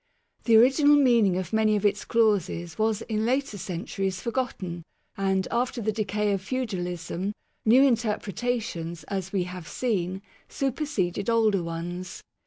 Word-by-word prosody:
The 225 -2 +6
original 280 +5 +6
meaning 235 -9 +4
of 185 0 -4
many 220 -1 +3
of 210 0 -1
its 205 0 +1
clauses 195 -7 +1
was 220 0 +1
in 215 -1 -2
later 260 0 0
centuries 190 +1 -3
forgotten, 210 -9 -3 0.3
and, 190 -1 0
after 245 +1 0
the 215 -1 0
decay 210 0 -1
of 195 -2 0
feudalism, 190 -5 -3 0.3
new 245 +5 +6
interpretations 225 -7 -1
(as 190 -2 -3
we 195 -3 +1
have 180 -2 -8
seen) 190 -6 -2 0.3
superseded 240 - -1
older 220 -4 +3
ones. 175 +2 -5
205 Hz, 135 wpm, -26 LUFS, 185-235 Hz, 0.3 s, The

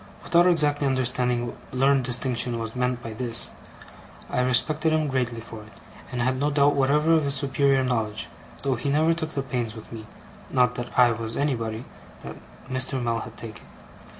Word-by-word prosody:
Without 175 +1 +4
exactly 150 -4 +2
understanding 125 -2 0
what 120 - -7
learned 135 +1 +3
distinction 125 -1 +1
was 115 0 -5
meant 125 -1 -1
by 115 - -6
this, 115 0 +3 0.8
I - - +1
respected 150 +5 +2
him 155 -1 +1
greatly 125 -4 -1
for 115 -1 -9
it, 105 0 -15 0.4
and 125 -1 -1
had 130 +1 0
no 145 +2 +1
doubt 145 0 +3
whatever 150 +4 +3
of 160 -2 +3
his 140 0 +2
superior 135 0 +2
knowledge: 110 -4 -2 0.4
though 135 -1 +1
he 125 +3 -3
never 155 +3 +3
took 160 -1 -3
the 140 - -1
pains 120 -4 -3
with 110 - -11
me 110 -2 -8 0.4
not 125 -1 +2
that 120 -1 -6
I 125 -1 +6
was 115 0 -4
anybody 115 -5 -2 0.4
that - - -7 0.3
Mr. 130 0 -1
Mell 115 -2 -1
had - - -9
taken. 110 -2 -8
125 Hz, 180 wpm, -25 LUFS, 120-140 Hz, 0.8 s, I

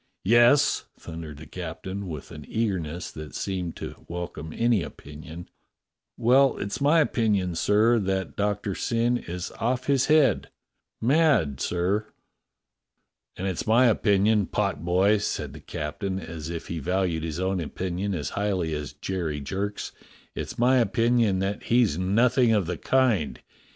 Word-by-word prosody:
"Yes?" 120 +7 +5
thundered 80 -3 -8
the 80 - -10
captain, 95 +4 -6
with 75 -5 -7
an 75 - -9
eagerness 90 -7 -2
that 75 -3 -9
seemed 90 -3 -3
to - - -8
welcome 85 -2 -6
any 115 -1 +2
opinion. 80 +2 -9 0.3
" - - -61 0.2
— - - -63
well, 130 +4 +4
it's 100 +7 -4
my 150 +4 +5
opinion, 105 - +1
sir, 110 +7 +3
that 95 -1 -2
Doctor 105 -1 -1
Syn 120 +4 0
is 90 +1 -6
off 125 +2 0
his 135 -2 +2
head 150 -8 +3 0.3
— - - -54
mad, 130 - +3
sir." 95 +5 0 1.3
"And 95 - -4
it's 95 +1 -3
my 120 +4 +5
opinion, 105 -3 +3
potboy," 90 +7 +1
said - - -3
the - - -10
captain, 95 +6 -4
as 80 -2 -7
if 85 -1 -5
he 85 - -4
valued 90 0 0
his 80 0 -4
own 95 0 0
opinion 95 +4 -3
as 75 -6 -3
highly 95 -6 -1
as 75 -2 -4
Jerry 85 -6 -3
Jerk's, 100 +8 -4 0.4
"it's - - -6
my 125 +2 +4
opinion 115 -4 +2
that 100 +1 -3
he's 115 -9 +3
nothing 115 +5 +3
of 105 -4 +2
the 90 - -4
kind. 110 - +1
95 Hz, 150 wpm, -26 LUFS, 85-115 Hz, 1.3 s, Yes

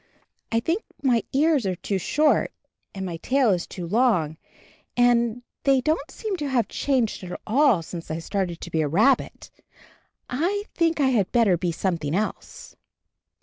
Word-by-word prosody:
I 230 - +3
think 330 - -1 0.2
that - - -14
my 240 -3 +4
ears 290 -5 +2
are 185 - -1
too 195 +2 -2
short 300 - +2 0.4
and 190 -1 -4
my 170 -3 -4
tail 255 +5 +2
is 180 -2 -1
too 180 - -7
long, 180 -7 +1 0.6
and 240 -1 +3 0.2
they 275 -1 +4
don't 305 +2 -1
seem 425 -4 -4
to 295 - -3
have 240 -6 +1
changed 250 -8 -1
at 180 -1 -6
all 240 - +3
since 165 +1 -8
I 155 - -2
started 175 0 -3
to 170 - -7
be 160 - +1
a 150 - +1
rabbit. 220 - +1 0.8
I 360 +10 -1
think 330 -2 +1
I 270 -2 +4
had 215 -7 +1
better 225 -7 +4
be 175 0 -1
something 165 -3 -2
else." 215 +3 -4
230 Hz, 170 wpm, -24 LUFS, 180-275 Hz, 0.8 s, my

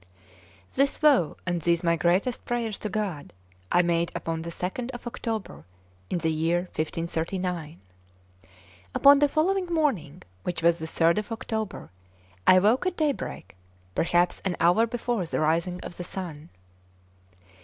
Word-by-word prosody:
This 275 +1 +2
vow 285 - +3
and 175 -1 -1
these 170 +1 +1
my 170 -1 +3
greatest 185 +9 +1
prayers 235 -4 -2
to 210 - -3
God 195 -9 -3 0.4
I 175 - +5
made 170 0 +1
upon 165 0 -3
the 170 - -5
2nd 190 +9 -4
of 240 - -10
October 220 - -4 0.5
in - - 0
the 160 -1 0
year 165 +2 +1
1539. 165 +1 -3 1.2
Upon 280 0 +7
the 290 0 +4
following 365 +5 +1
morning, 280 - -1 0.2
which 175 - -4
was 170 0 +4
the 160 - -4
3rd 165 +3 +3
of 210 +2 -7
October, 220 - -4 0.6
I 185 - +8
woke 220 - +3
at 365 - -2
daybreak, 285 - -2 0.4
perhaps 175 - +1
an 185 -3 -1
hour 180 +7 +4
before 235 -5 -2
the - - -2
rising 170 +3 +1
of 175 - -8
the 180 - -4
sun. 170 -4 -6
180 Hz, 145 wpm, -26 LUFS, 165-235 Hz, 1.2 s, I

